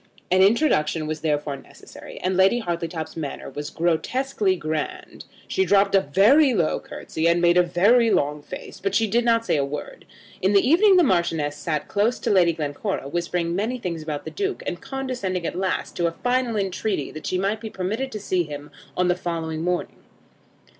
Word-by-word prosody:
An 185 +1 +5
introduction 190 - +3
was 155 0 -4
therefore 150 -2 -1
necessary, - - -13
and 185 +1 0
Lady 190 +5 +4
Hartletop's 170 -5 -4
manner 155 -4 -6
was 145 0 -5
grotesquely 190 +5 0
grand. 180 - -5 0.2
She 380 - +1
dropped 200 - +3
a 195 - +5
very 225 - +4
low 170 -5 +1
curtsey, 160 +1 -3
and 170 +1 +3
made 175 0 +4
a 180 - +6
very 205 +7 +4
long 150 -5 +1
face, - - -9
but 195 0 -2
she 225 - +3
did 235 +3 +1
not 230 -1 +2
say 160 - +1
a 140 - +1
word. 145 +2 -6 0.4
In 190 +2 +2
the 200 +4 +4
evening 375 +6 +6
the 355 - +6
Marchioness 170 - +1
sat 150 -3 -3
close 215 +4 +1
to - - -1
Lady 175 -4 +4
Glencora, 150 +2 -3
whispering 170 +1 -1
many 220 +6 -1
things 175 -8 -4
about 155 -2 -5
the - - -6
Duke; 395 -1 -3
and 175 - -4
condescending 255 -10 -3
at - - -2
last 190 +1 -2
to 170 -1 +2
a - - -1
final 245 +3 -1
entreaty 195 -5 -2
that 155 - -7
she 185 - 0
might 200 +4 -1
be 220 - -5
permitted 215 +8 -3
to 215 - -4
see 185 -2 0
him 145 -2 -7 0.3
on 180 - +2
the 180 - +4
following 165 -2 -4
morning. 180 +1 -2
185 Hz, 195 wpm, -23 LUFS, 160-225 Hz, 0.4 s, a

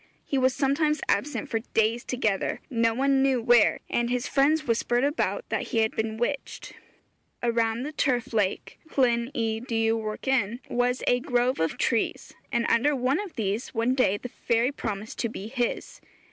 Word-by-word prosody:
He 275 - 0
was 260 0 +2
sometimes 300 +2 +1
absent 290 +7 0
for 225 - -1 0.2
days 225 +2 +2
together, 220 -6 -1
no 230 -2 +2
one 270 +1 +2
knew 265 -2 +3
where, 235 -1 +4
and 240 0 0
his 250 +1 -1
friends 305 +3 +2
whispered 240 0 +1
about 295 - -1
that - - -2
he - - -3
had 220 -1 +3
been 220 0 -2
witched. 270 +4 -3 0.7
Around 230 0 +1
the 300 - -4
Turf 250 -6 0
Lake 205 -4 -1 0.2
(Llyn 235 -3 +3
y 225 -2 -1
Dywarchen) 225 0 0
was 245 +1 0
a 245 - +3
grove 250 -2 0
of 160 0 0
trees, 230 -3 -1 0.2
and 235 -1 +1
under 280 +5 +3
one 260 +5 +1
of 405 -4 -6
these 215 +3 -3
one 230 +3 +2
day 255 -7 +2
the 250 - -7
fairy 235 +2 0
promised 215 -5 -5
to 235 - 0
be 210 -2 -7
his. 245 -1 -3
240 Hz, 170 wpm, -26 LUFS, 225-265 Hz, 0.7 s, where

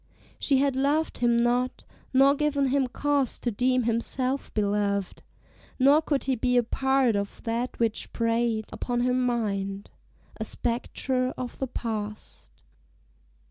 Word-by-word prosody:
she 275 - +3
had 275 0 +2
loved 290 +4 0
him 240 -1 +3
not, 245 +2 +1 0.3
Nor 275 +1 +5
given 285 -2 +1
him 270 0 +2
cause 285 0 0
to 240 - -2
deem 250 +3 +1
himself 255 +4 -1
beloved, 200 -2 0 0.6
Nor 280 +4 +5
could 290 -3 -1
he 265 -1 0
be 250 +1 +1
a 245 - +4
part 265 -1 +1
of 200 0 -4
that 235 +2 -2
which 230 -2 -1
preyed 230 -1 0
Upon 245 -1 -2
her 250 +1 +2
mind 205 -6 -1 0.5
a 220 - -3
spectre 255 +3 -2
of 250 -2 -6
the 265 - -1
past. 215 -3 -5
245 Hz, 140 wpm, -27 LUFS, 230-265 Hz, 0.6 s, Nor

